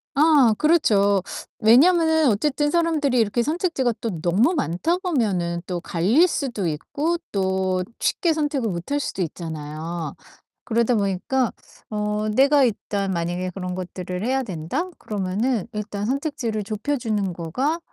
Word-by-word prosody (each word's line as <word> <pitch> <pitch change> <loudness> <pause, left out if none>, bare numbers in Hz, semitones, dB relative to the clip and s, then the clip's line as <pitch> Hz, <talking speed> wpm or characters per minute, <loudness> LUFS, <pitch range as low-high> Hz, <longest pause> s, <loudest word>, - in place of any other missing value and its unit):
아 285 -6 +5
그렇죠. 205 - +3 0.4
왜냐면은 320 +6 +5
어쨌든 295 +7 +1
사람들이 310 -7 +2
이렇게 225 +2 +2
선택지가 305 -6 0
또 210 -8 -3
너무 195 - +3
많다 285 - 0
보면은 200 - -1
또 180 -2 -2
갈릴 210 - +3
수도 240 - -2
있고 290 - -2
또 190 -1 0 0.2
쉽게 340 -3 +1
선택을 295 -6 -1
못 175 +2 -5
할 290 - +2
수도 235 - -3
있잖아요. 160 -1 -5 0.5
그러다 235 +1 +1
보니까 205 +5 0 0.4
어 210 0 -1
내가 275 +4 +5
일단 200 -4 -1
만약에 175 +2 -2
그런 180 0 -5
것들을 180 +1 -5
해야 265 +1 +1
된다? 200 - -3
그러면은 210 +3 -2
일단 210 -1 -4
선택지를 260 -6 -2
좁혀 215 +8 -2
주는 210 -6 -1
거가 255 - -2
215 Hz, 300 characters per minute, -23 LUFS, 185-285 Hz, 0.5 s, 아